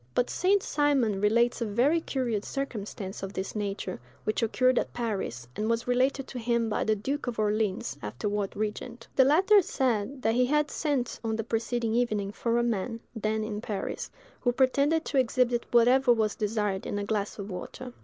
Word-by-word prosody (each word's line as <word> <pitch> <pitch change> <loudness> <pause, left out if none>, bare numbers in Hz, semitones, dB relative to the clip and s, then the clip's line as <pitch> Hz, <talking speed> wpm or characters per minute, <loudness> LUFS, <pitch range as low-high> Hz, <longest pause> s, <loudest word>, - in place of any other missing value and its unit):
But 245 - +1
St. 390 +2 +2
Simon 270 -9 +1
relates 235 +4 +3
a - - +1
very 260 +11 +2
curious 240 -9 -2
circumstance 215 -7 -5
of 195 0 -5
this 190 +2 -4
nature, 200 -3 -3 0.2
which 215 - -1
occurred 255 +3 +3
at - - -4
Paris, 195 - -3
and 215 +1 -1
was 230 +1 0
related 260 +2 +1
to 255 - -5
him 235 -1 +1
by 210 - 0
the 220 - +2
duke 270 +7 -3
of 240 - -3
Orleans, 215 -1 0
afterward 195 - -3
regent. 230 +3 -4
The 265 - +7
latter 380 +9 +6
said 260 - -1
that 225 - +3
he 250 +1 +3
had 300 +2 +1
sent 285 -6 -1
on 220 -1 -1
the 225 - -2
preceding 230 +1 -1
evening 215 -4 0
for 230 +2 0
a 240 - +2
man, 230 0 -1 0.2
then 220 0 -1
in 215 -1 -4
Paris, 210 -4 -4 0.3
who 245 - +2
pretended 280 +5 +2
to 280 - +1
exhibit 245 -1 +1
whatever 245 +2 +5
was 220 -3 +2
desired 210 -2 -1
in - - -2
a 205 - -2
glass 205 -1 -2
of 200 -1 -6
water. 245 +7 -7
230 Hz, 185 wpm, -28 LUFS, 210-255 Hz, 0.3 s, The